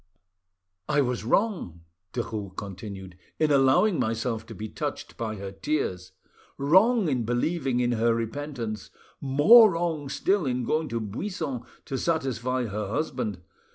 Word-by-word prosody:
"I 145 -1 +3
was 125 -4 -1
wrong," 145 - 0 0.3
Derues 105 -5 -4
continued, 95 -2 -7 0.2
"in 155 -1 +2
allowing 140 +8 +4
myself 115 0 -1
to - - -9
be 110 - -5
touched - - -5
by 110 -2 -3
her 100 -1 -6
tears, 95 -5 -2 0.5
wrong 190 - +4
in 130 -5 0
believing 125 +3 0
in 120 0 +1
her 115 0 +2
repentance, 115 -3 -4 0.3
more 175 - +7
wrong 165 -4 -2
still 190 +3 +1
in 125 -1 -1
going 155 +6 0
to 115 -1 -2
Buisson 135 - -4 0.2
to 135 - -3
satisfy 130 -6 0
her 105 -1 -3
husband. 110 - -3
125 Hz, 135 wpm, -27 LUFS, 110-155 Hz, 0.5 s, more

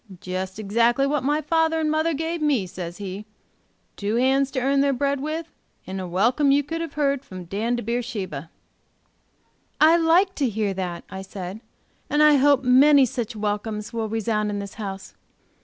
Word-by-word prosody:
'Jest 185 +1 -5
exactly 235 +5 +2
what 285 -1 0
my 295 +3 +1
father 325 +1 +1
and 310 -1 0
mother 315 +1 +1
gave 325 +2 -3
me,' 280 -10 +1
says 175 -1 -7
he; 200 0 -6 0.7
'two 205 +2 -2
hands 265 +2 +2
to 270 - -2
earn 275 +2 +2
their 280 0 +3
bread 280 +2 0
with, 315 +3 -4 0.3
and 190 0 -5
a 185 - -5
welcome 235 - +2
you 285 +1 +4
could 325 +4 -4
have 330 -3 -5
heard 280 -2 0
from 185 -1 -9
Dan 220 +7 -1
to 240 - -4
Beersheba.'" 205 - -4 1.3
"I 320 +2 +6
like 345 +4 +3
to 275 -4 +1
hear 210 -2 -1
that!" 180 -2 -4
I 190 - -6
said. 190 +1 -7 0.5
"And 295 +1 +3
I 300 -1 +6
hope 280 0 +4
many 270 +2 +6
such 240 -3 -4
welcomes 210 +1 -3
will 225 -2 -2
resound 215 -1 -1
in 205 - -3
this 200 -1 -6
house. 195 -3 -7
245 Hz, 180 wpm, -23 LUFS, 205-290 Hz, 1.3 s, I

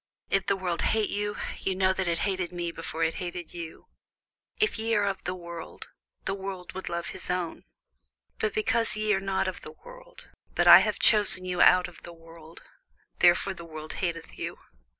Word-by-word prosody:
If 195 0 +1
the 200 - +3
world 180 -3 -2
hate 220 -2 +1
you, 205 0 -2 0.2
ye 190 - -1
know 190 0 +3
that 190 -1 -2
it 170 0 +1
hated 185 -3 -1
me 175 -1 -3
before 165 0 -4
it 165 0 +1
hated 175 -1 -6
you. 170 -2 -8 0.7
If 430 - +1
ye 225 0 +1
were 205 - +2
of 195 -1 -2
the 180 - -2
world, 170 -2 -9 0.3
the 195 - 0
world 190 -2 -6
would 190 - -5
love 170 0 -3
his - - -3
own: 180 -2 -3 0.7
but 215 - 0
because 230 +1 +1
ye 215 0 +1
are 190 - +1
not 195 -1 -1
of 185 - -5
the 155 - -9
world, - - -13 0.2
but - - +2
I - - +11
have - - 0
chosen 205 -4 +5
you 180 -1 -1
out 180 0 +6
of - - -14
the 175 - -10
world, 165 0 -14 0.6
therefore 175 +2 +4
the 170 - -10
world 155 -1 -8
hateth 170 -3 -4
you. - - -4
185 Hz, 195 wpm, -27 LUFS, 170-200 Hz, 0.7 s, I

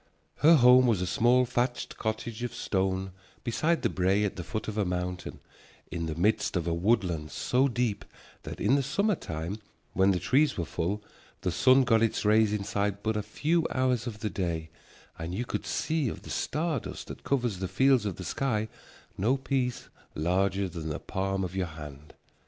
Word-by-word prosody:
Her 165 +3 +7
home 125 -1 +7
was 110 -6 +2
a 90 - -1
small 120 +7 +3
thatched 120 0 -1
cottage 110 +1 -3
of 120 -1 -4
stone 95 -1 -1 0.3
beside 155 +8 0
the - - +3
brae 95 +3 +2
at 100 - -2
the 90 - -5
foot 110 +5 -4
of 105 - -4
a 105 - +1
mountain, 90 -1 -3 0.5
in 85 -1 -3
the 80 - -3
midst 105 +3 +1
of 85 - -2
a 85 - 0
woodland 85 -4 +1
so 130 - +1
deep 120 -4 -1 0.4
that - - -8
in 105 +6 +2
the 140 - +4
summer 200 +11 +1
time 85 - -5 0.3
when 95 +1 +4
the 95 - +3
trees 140 +6 +2
were 85 - -1
full 90 +6 -2 0.4
the 90 - 0
sun 130 +8 +5
got 115 -3 +3
its 115 -1 +1
rays 110 0 +4
inside 100 -1 -1
but 110 0 0
a 105 - 0
few 155 +10 0
hours 130 -2 +1
of 110 -3 -6
the 105 - -1
day 80 -4 -3 0.5
and 85 +2 -4
you 120 +5 -2
could - - -4
see 155 -5 0
of - - -8
the - - -8
star 155 -1 -1
dust - - -8
that - - -9
covers 120 -8 0
the 95 - -2
fields 130 +5 +3
of 100 -4 -2
the 95 - -7
sky 110 0 -1 0.5
no 120 +8 +2
piece 130 -2 -2 0.3
larger 95 +4 +1
than 80 -3 -6
the 75 - -2
palm 95 0 -2
of 90 0 -4
your 95 -2 0
hand. 75 -2 -10
105 Hz, 195 wpm, -28 LUFS, 90-125 Hz, 0.5 s, Her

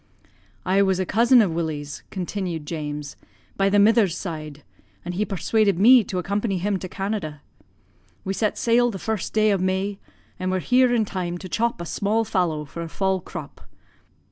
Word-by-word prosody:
"'I 190 +2 +3
was 190 -2 +2
a 185 - 0
cousin 235 +5 +5
of 190 - -1
Willie's,' 150 -3 -4
continued 180 -4 -4
James, 150 -2 -5 0.4
'by 195 0 +2
the 205 - +3
mither's 205 -4 +4
side, 155 -5 -6 0.4
and 175 - -4
he 200 +4 0
persuaded 200 0 +1
me 240 +5 +7
to 185 - -4
accompany 200 +2 -1
him 195 +2 -1
to 185 - -6
Canada. 190 -7 -4 0.8
We 195 - -1
set 215 +1 -1
sail 240 +1 +3
the 205 - -5
first 220 -1 -3
day 215 -1 +3
of 195 -2 +1
May, 190 +2 -1 0.4
and 185 0 -2
were 185 - +1
here 250 +6 +3
in 230 -3 +2
time 180 -3 -3
to 185 - -8
chop 230 +2 -1
a 170 - -5
small 210 +6 0
fallow 165 -6 -1
for 170 +4 -8
a 165 - -5
fall 190 +2 0
crop. - - -9
190 Hz, 180 wpm, -23 LUFS, 170-210 Hz, 0.8 s, me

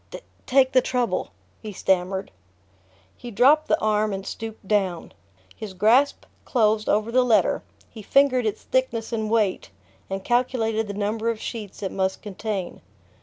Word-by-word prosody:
"take 260 -1 +4
the 255 - +5
trouble," 250 -1 -1 0.3
he 215 - -7
stammered. 190 0 -1 0.8
He 245 - -9
dropped 280 +8 +4
the - - +2
arm 215 -1 +1
and 195 0 -5
stooped 220 -2 -7
down. 190 -5 0 0.4
His 205 -3 -8
grasp 240 +9 +3 0.2
closed 215 -3 +1
over 215 +2 +1
the 255 +2 +4
letter, 235 -3 +2 0.3
he 220 - -11
fingered 255 +1 +3
its 210 - -4
thickness 235 -3 -1
and 220 -1 -2
weight 215 -4 0 0.4
and 195 0 -4
calculated 225 -2 0
the 200 - -5
number 215 +3 -1
of 230 -2 -2
sheets 210 -5 -7
it 190 - -2
must 190 0 -2
contain. 205 -2 -5
220 Hz, 150 wpm, -24 LUFS, 200-240 Hz, 0.8 s, the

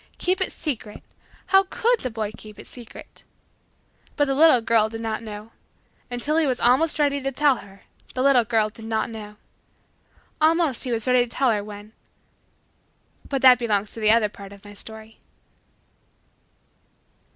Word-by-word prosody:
Keep 370 +1 0
it 375 - 0
secret! 235 -9 -6 0.4
How 385 0 +4
could 475 +1 +1
the 255 - -4
boy 220 -2 -4
keep 215 -1 -13
it - - -11
secret! 240 -3 -13 0.9
But 290 - +2
the 275 - -1
little 300 -2 +6
girl 225 -1 +2
did 225 0 -7
not 220 -1 -3
know. 215 0 -9 0.6
Until 250 +6 -2
he 320 -2 +2
was 255 -2 -1
almost 265 +8 +3
ready 285 -2 +1
to 270 0 -2
tell 280 -1 +3
her, 195 0 -14 0.3
the 255 - 0
little 270 -3 +5
girl 220 -1 +1
did 220 +1 -13
not 225 +1 -2
know. 210 -2 -9 1.1
Almost 315 -5 +2
he 250 - -3
was 225 -2 0
ready 250 -1 +4
to - - -15
tell 260 +1 +1
her, 210 -2 -1
when 210 +1 -11 1.4
But 275 -2 -2
that 250 -1 +8
belongs 210 -4 -1
to - - -9
the 215 -1 +2
other 220 -1 +4
part 200 -1 -12
of 200 0 -15
my 205 - -11
story. 220 +1 -11
230 Hz, 170 wpm, -23 LUFS, 215-275 Hz, 1.4 s, that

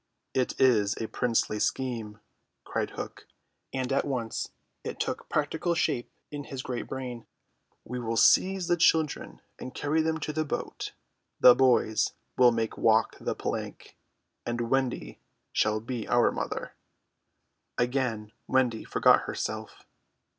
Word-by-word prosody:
"It 130 -1 0
is 110 -6 +4
a 115 - -2
princely 115 -3 0
scheme," 115 -4 -2 0.4
cried - - -2
Hook, - - -7 0.4
and 130 0 -2
at 140 - +2
once 125 -5 -3 0.3
it - - -5
took - - -3
practical 160 +3 0
shape 120 -7 0 0.2
in 145 -1 -5
his 135 -1 -6
great 125 -2 -4
brain. 125 -3 -6 0.6
"We 125 +1 -4
will 115 -1 -2
seize 190 +5 +4
the 175 -1 +3
children 155 - +2 0.2
and 130 - -8
carry 155 +2 +1
them 160 0 0
to 150 - -3
the 155 +1 0
boat: 150 - -4 0.5
the 125 - +9
boys 125 -4 +3 0.2
we - - -3
will 120 - +8
make 115 -1 -2
walk 110 -1 +3
the - - -2
plank, - - -5 0.5
and 120 0 -3
Wendy 135 -2 -1 0.3
shall 110 0 +2
be 115 +1 -5
our 120 0 +4
mother." - - -4 1.0
Again 120 -4 -1 0.2
Wendy 125 -4 +2
forgot - - +4
herself. - - -5
125 Hz, 140 wpm, -28 LUFS, 115-135 Hz, 1.0 s, the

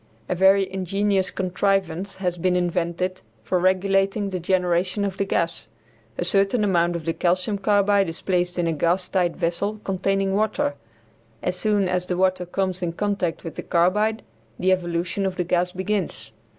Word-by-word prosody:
A - - 0
very 190 +2 +4
ingenious 195 0 0
contrivance 190 0 -1
has 180 -2 -2
been 180 +1 +1
invented 175 +1 -1 0.2
for 145 +11 0
regulating 195 +2 +1
the 185 - -2
generation 180 +2 +1
of 195 -1 -3
the 200 - 0
gas. 170 -3 -1 0.5
A 175 - -1
certain 200 +4 +2
amount 175 -3 +2
of 165 -2 -5
the 165 - 0
calcium 185 +5 0
carbide 200 -2 +3
is 165 - -6
placed 180 -1 0
in 175 - +1
a 165 - +1
gas 175 +4 +1
tight 180 -3 0
vessel 200 +6 -1
containing 195 0 0
water. 210 -7 +1 0.7
As 180 - 0
soon 205 0 +1
as 180 0 -1
the 180 - -1
water 185 -1 +1
comes 185 0 -1
in 170 -2 -2
contact 200 -3 -2
with 165 - -6
the - - -5
carbide 210 +6 +1 0.3
the 185 +1 +2
evolution 175 +1 -1
of 190 -1 -1
the 180 - 0
gas 180 +1 0
begins. 190 - -3
185 Hz, 170 wpm, -23 LUFS, 175-195 Hz, 0.7 s, very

